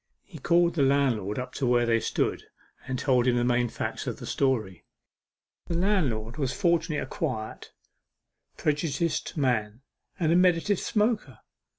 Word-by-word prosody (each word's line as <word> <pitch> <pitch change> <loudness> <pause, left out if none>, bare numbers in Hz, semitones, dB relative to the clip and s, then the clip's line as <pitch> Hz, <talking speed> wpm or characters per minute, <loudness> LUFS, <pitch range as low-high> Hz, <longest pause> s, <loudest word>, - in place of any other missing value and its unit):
He 170 -6 -12
called 170 +4 +3
the 160 - 0
landlord 130 -7 +1
up 125 0 -5
to 135 - -1
where 120 0 +3
they 115 -1 +2
stood, - - -1 0.4
and 130 -1 -2
told 125 -2 +2
him 125 - +3
the 120 - +1
main 120 0 +2
facts - - -4
of - - -3
the - - -8
story. 115 -10 -1 0.8
The 170 - -1
landlord 150 - 0
was 135 -4 -1
fortunately 170 -4 +1
a - - -2
quiet, 120 -9 -4 0.9
prejudiced 155 +3 -1
man, 120 -4 0 0.4
and 165 -2 +2
a - - +4
meditative 180 +2 +3
smoker. 210 - -1
135 Hz, 155 wpm, -27 LUFS, 120-170 Hz, 0.9 s, a